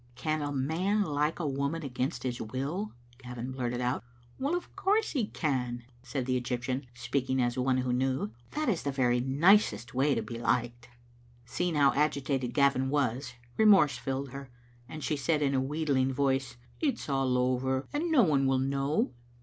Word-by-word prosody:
"Can 155 +5 -1
a 145 0 -2
man 165 +10 +1
like 150 -2 0
a 170 - -2
woman 140 +4 -2
against 130 +2 -3
his 125 -2 -3
will?" 140 - -3 0.3
Gavin 125 0 -6
blurted 125 -1 -2
out. 125 0 -1 0.4
"Of 345 +5 -2
course 425 +3 +1
he 245 -8 0
can," 125 - -2 0.2
said 125 +1 -3
the 130 0 0
Egyptian, 125 +1 -3
speaking 130 +2 -1
ad 120 -1 +1
one 130 0 +1
who 125 -1 0
knew. 130 -3 0
" 120 - -28
That 305 0 -1
is 200 -8 +1
the 140 - -2
very 125 -2 +2
nicest 135 - +3
way 135 +2 +2
to - - -1
be 115 -1 -6
liked. 120 0 -1 0.3
'* 120 0 -29
Seeing 175 +6 -1
how 140 -3 +5
agitated 140 -3 0
Gavin 140 -2 +3
was, 135 -3 0 0.2
remorse 195 - +5
filled 135 0 -3
her^ 140 0 -7 0.4
and 155 +1 -7
she 150 - 0
said 150 +2 +1
in 140 -1 +1
a 130 - +2
wheedling 135 -2 0
voice 135 -2 0
— 120 - -28
" - - -27
It 285 -6 +2
is - - -9
all 135 -3 +1
over, 130 +1 0
and 315 +4 -1
no 275 -7 +6
one 140 -6 +3
will 135 0 +3
know." 135 0 0
135 Hz, 190 wpm, -30 LUFS, 125-150 Hz, 0.4 s, no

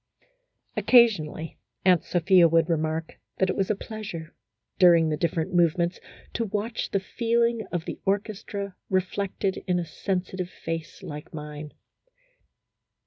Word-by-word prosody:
Occasionally 185 -10 +3 0.3
Aunt 180 -3 +5
Sophia 180 0 +5
would 165 +1 +3
remark 160 0 -2 0.2
that 190 -1 +2
it - - -4
was 195 - 0
a 215 - +2
pleasure, 195 -7 -7 0.5
during 170 -3 +6
the 155 - +1
different 165 +3 -1
move 170 -1 +4
ments, 170 +1 0 0.3
to 230 - -1
watch 215 +3 -3
the 195 - +1
feeling 235 +3 0
of 175 -2 -2
the - - -6
orchestra 200 -1 -2
reflected 190 +1 -1
in 180 -1 +2
a 175 - -1
sensitive 185 0 -3
face 165 +2 -6
like 150 -2 -8
mine. 150 0 -7
180 Hz, 135 wpm, -26 LUFS, 165-200 Hz, 0.5 s, during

